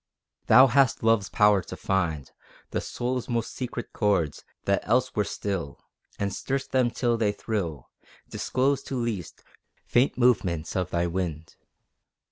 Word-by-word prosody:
Thou 130 - +8
hast 135 -1 +3
Love's 115 -3 +3
power 105 -2 +4
to - - -8
find 85 -8 -1 0.4
The - - -1
soul's 125 +1 -3
most 120 -1 -2
secret 125 -2 -5
chords, 95 -9 0 0.2
that 100 0 +2
else 125 +1 +2
were 105 - +2
still, 95 -9 -4 0.4
And 100 -1 -2
stir'st 135 +5 -3
them 130 -2 +3
till 120 0 0
they 110 -2 +2
thrill 95 - -4 0.4
Disclosed 135 +2 -1
to 135 - -4
least, 115 -9 -4 0.4
faint 125 +3 +2
movements 95 -10 +1
of 90 -2 -1
thy 85 0 0
wind. 85 -3 -4
105 Hz, 140 wpm, -26 LUFS, 90-125 Hz, 0.4 s, Thou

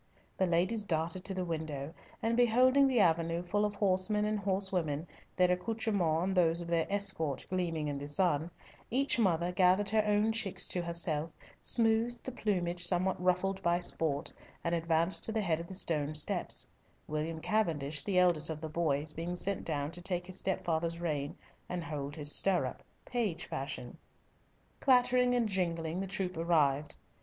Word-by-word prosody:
The 190 - +1
ladies 185 +6 +1
darted 170 0 -1
to 195 - -3
the 185 -1 -2
window, 155 -3 -4 0.3
and 230 +1 +1
beholding 255 +3 +5
the 255 -3 +2
avenue 170 -2 +2
full 205 +4 0
of 210 -1 -3
horsemen 200 +2 +2
and 210 0 0
horsewomen, 185 -6 0 0.3
their 180 -1 +4
accoutrements 180 -4 0
and 190 +1 -1
those 170 -2 +4
of 170 - -5
their 165 -1 +1
escort 195 -8 -1
gleaming 165 -4 -1
in 145 -1 -3
the 145 - -6
sun, 160 0 +1 0.4
each 265 +1 +2
mother 175 -4 +2
gathered 185 +2 +3
her 215 0 +3
own 210 +1 +3
chicks 220 -4 -1
to 180 - 0
herself, 170 -2 -2 0.3
smoothed 230 +1 +1
the 260 - -5
plumage 180 -7 -1
somewhat 180 +1 +1
ruffled 190 +2 +1
by 170 -1 +2
sport, 160 -4 -1 0.3
and 170 - -1
advanced 165 +1 +2
to - - -2
the 220 0 0
head 165 -5 0
of 170 - -7
the 190 - -6
stone 155 -5 0
steps, 150 - 0 0.4
William 155 +2 -3
Cavendish, 160 -7 0
the 190 +4 -1
eldest 175 -4 +4
of 160 -1 -4
the 160 0 -5
boys, 155 -2 0
being 170 +3 -4
sent 195 +2 -1
down 145 -2 -2
to 175 - -4
take 180 -1 -2
his 185 0 -3
stepfather's 170 -2 -1
rein 155 -1 -3 0.3
and 180 -1 -3
hold 145 -2 -5
his 150 -2 -3
stirrup, 175 -10 +1 0.2
page 210 -9 -2
fashion. 130 -3 -6 0.8
Clattering 250 -1 +4
and 240 -2 +2
jingling 170 -3 -1
the 195 - -3
troop 185 -1 -3
arrived. 150 -4 +2
175 Hz, 170 wpm, -32 LUFS, 160-200 Hz, 0.8 s, beholding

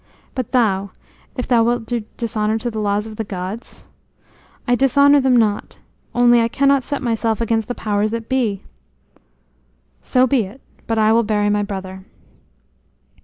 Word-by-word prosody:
But 255 -4 -4
thou, 200 -6 +1 0.4
if 250 - -4
thou 235 -2 +4
wilt 240 0 0
do 240 +1 -2 0.2
dishonor 220 -2 -1
to 240 +2 -4
the 220 - -4
laws 205 0 0
of 220 -1 -9
the 225 - -2
gods?" 195 +3 -7 0.8
"I 245 - +3
dishonor 280 +3 +4
them 260 -1 +3
not. 215 -3 0 0.4
Only 240 -1 +5
I 230 - +2
cannot 275 +3 +2
set 285 +1 -4
myself 225 -2 0
against 225 -2 0
the 245 - -4
powers 210 0 -1
that 230 0 -5
be." 235 -7 -1 1.4
"So 255 0 +2
be 255 -4 +1
it; 210 +8 -12 0.3
but 225 - -1
I 220 0 +4
will 230 - +4
bury 210 -2 0
my 205 0 +1
brother." 190 -2 -6
225 Hz, 165 wpm, -19 LUFS, 210-245 Hz, 1.4 s, Only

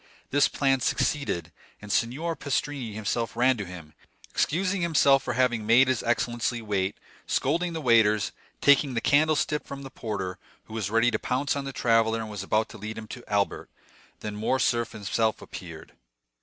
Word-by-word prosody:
This 145 0 +4
plan 135 -2 +1
succeeded; 120 - -1 0.3
and 105 -1 -8
Signor 150 +11 0
Pastrini 140 -6 -3
himself 115 +2 -2
ran 130 +2 +4
to 105 - -4
him, 85 -4 -10 0.4
excusing 185 +3 0
himself 140 -5 +4
for 120 - -3
having 120 -3 +1
made 120 +5 +5
his 130 -2 +1
excellency 120 0 0
wait, 100 -3 -1 0.3
scolding 170 +1 0
the 160 - -4
waiters, 110 -5 +4 0.3
taking 140 -2 +4
the - - +2
candlestick 150 0 +2
from 140 0 -8
the 135 - -9
porter, 95 -6 -4 0.2
who 110 - -13
was 110 -3 -2
ready 115 +2 +3
to 110 - -1
pounce 140 +3 -1
on 140 -1 -3
the 135 - -4
traveller 115 -3 +2
and 110 -1 -5
was 105 -2 -5
about 105 +3 +1
to 110 - -11
lead 110 +2 -6
him 110 0 -7
to 120 - -8
Albert, 100 -1 0 0.5
when 105 -1 -5
Morcerf 115 +1 +1
himself 110 +1 0
appeared. 80 -3 -10
115 Hz, 170 wpm, -27 LUFS, 105-135 Hz, 0.5 s, made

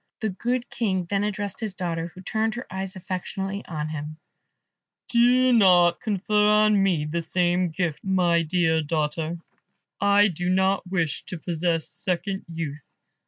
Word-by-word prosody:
The 220 - 0
good 240 +6 -2
King 190 -6 -1
then 200 +3 -1
addressed 205 -1 -3
his 215 -4 -4
daughter, 170 -2 -3
who 180 +2 -13
turned 220 +4 -1
her 240 - -6
eyes 190 +1 -4
affectionately 195 +2 -4
on 155 -2 -4
him, 155 0 -6 0.9
"Do 250 +2 +4
not 175 -6 +5
confer 210 0 +1
on 210 -1 +4
me 180 -6 +1
the 165 +3 -2
same 175 +2 +1
gift, 165 -2 -3
my 180 -3 +2
dear 160 -1 +1
daughter; 155 +2 -2 0.6
I 200 +1 +5
do 180 +1 -3
not 190 +1 +1
wish 165 -6 -1
to 180 - -6
possess 165 -1 -1
second 185 +2 -3
youth. 155 -3 -6
185 Hz, 150 wpm, -25 LUFS, 165-205 Hz, 0.9 s, not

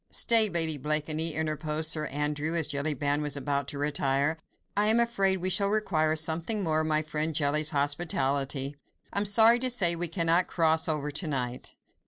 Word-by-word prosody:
"Stay, 225 -2 +4
Lady 160 -4 +3
Blakeney," 155 +2 -1
interposed 155 0 -1
Sir 155 -1 -2
Andrew, 150 +3 -3
as 165 -3 +1
Jellyband 145 0 -1
was 145 -2 -3
about 140 0 -2
to 145 - -6
retire, 140 +1 0 0.4
"I 205 +1 +1
am 225 +2 +3
afraid 195 -5 +1
we 185 +1 -1
shall 200 +2 +2
require 160 -7 0
something 165 +7 -1
more 155 -2 0
of 155 - -3
my 155 0 +1
friend 155 0 -3
Jelly's 150 +1 +2
hospitality. 140 -2 -2 0.4
I - - +1
am 205 - -2
sorry 225 +4 +5
to 255 +1 0
say 180 -9 +3
we 175 +1 0
cannot 165 +1 +1
cross 160 -1 +1
over 150 -1 -2
to 155 +3 -2
night." 125 -4 -5
155 Hz, 180 wpm, -27 LUFS, 145-175 Hz, 0.4 s, sorry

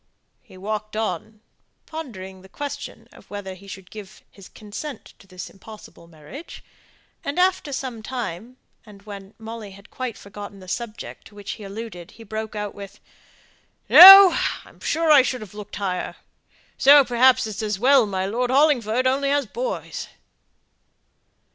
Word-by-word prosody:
He 185 - -17
walked 215 +2 -5
on, 215 0 -4 0.4
pondering 190 -13 -9
the 190 - -17
question 285 +7 -7
of - - -18
whether 205 -2 -7
he 190 +2 -15
could 190 0 -9
have - - -22
given 210 -1 -11
his 195 -2 -15
consent 225 +7 -9
to 195 - -19
this 185 -1 -9
impossible 205 -4 -14
marriage; 165 - -12 0.6
and 280 - -4
after 365 -4 +1
some 255 -4 -5
time, 235 0 -6 0.3
and 205 -3 -16
when 200 -1 -11
Molly 225 -1 -8
had 200 +3 -17
quite 255 -3 -5
forgotten 200 0 -10
the 185 - -14
subject 230 +3 -7
to 205 - -19
which 205 -1 -7
he 215 - -8
alluded, 195 -3 -8
he 230 - -12
broke 220 0 -6
out 210 -1 -4
with 200 -1 -11 0.9
"No! 385 -1 +11 0.3
I'm - - -19
sure 325 -1 0
I 290 -3 +8
should 255 -1 -3
have 210 -3 -11
looked 210 -1 -9
higher. 190 -3 -3 0.6
So, 285 0 +7
perhaps, 255 +1 +4
it's 215 -1 -5
as 210 -2 -2
well 255 +1 +4
my 190 -1 -2
Lord 240 +5 -2
Hollingford 255 -4 +2
has 260 - +4
only 275 +1 -1 0.2
boys." - - -4
215 Hz, 160 wpm, -22 LUFS, 200-260 Hz, 0.9 s, No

